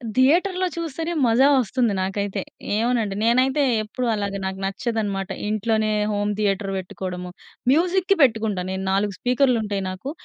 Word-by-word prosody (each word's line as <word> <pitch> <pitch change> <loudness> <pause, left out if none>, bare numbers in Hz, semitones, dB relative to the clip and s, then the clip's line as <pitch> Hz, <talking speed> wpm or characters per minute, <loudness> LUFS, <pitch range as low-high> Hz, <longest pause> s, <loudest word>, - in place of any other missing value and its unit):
థియేటర్‌లో 360 +8 +3
చూస్తేనే 330 +1 -3
మజా 245 +5 +5
వొస్తుంది 240 -2 +1
నాకైతే. 195 +1 -2 0.4
ఏమోనండి 225 -3 0
నేనైతే 260 +5 +3 0.2
ఎప్పుడూ 245 +3 -3
అలాగా 200 -1 -3
నాకు 190 0 -4
నచ్చదనమాట 200 -2 -2 0.2
ఇంట్లోనే, 215 0 0 0.2
హోమ్ 205 0 0
థియేటర్ 195 -1 0
వెట్టుకోవడము. 180 -1 -6 0.4
మ్యూజిక్‌కి 370 +4 +2
పెట్టుకుంటాను 215 -6 +1
నేను, 190 0 -4
4 200 +1 +1
స్పీకర్‌లుంటాయి. 235 -6 +1
నాకు 260 +10 -6
220 Hz, 125 wpm, -23 LUFS, 195-260 Hz, 0.4 s, మజా